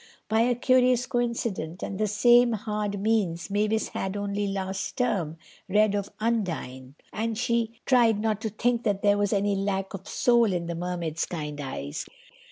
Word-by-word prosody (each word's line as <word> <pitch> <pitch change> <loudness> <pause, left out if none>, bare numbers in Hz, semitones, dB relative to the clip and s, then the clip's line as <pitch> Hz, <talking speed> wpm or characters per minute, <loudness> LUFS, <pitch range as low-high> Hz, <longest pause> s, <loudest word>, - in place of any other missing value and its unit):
By 220 +1 +2
a 245 +1 +3
curious 250 0 +3
coincidence 230 -9 -2
and 195 - -4
the 215 - +2
same 240 +3 +5
hard 210 -1 -2
means, 200 -4 0
Mavis 215 +2 +1
had, 195 +1 -3
only 205 0 -2
last 195 -1 -3
term, 180 -11 0 0.3
read 210 +1 +3
of 200 -1 -2
Undine, 165 - -2 0.2
and 225 0 -2
she 230 0 -1
tried 235 -5 +4
not 215 -1 -1
to 220 - -2
think 235 +3 0
that 205 -4 -1
there 205 0 +4
was 205 -1 +1
any 205 0 +1
lack 195 -1 -2
of 195 0 -8
soul 235 -4 +3
in 175 -1 -2
the 170 - -3
Mermaid's 170 -2 -3
kind 150 -3 -5
eyes. 145 +3 -5
205 Hz, 170 wpm, -26 LUFS, 190-225 Hz, 0.3 s, same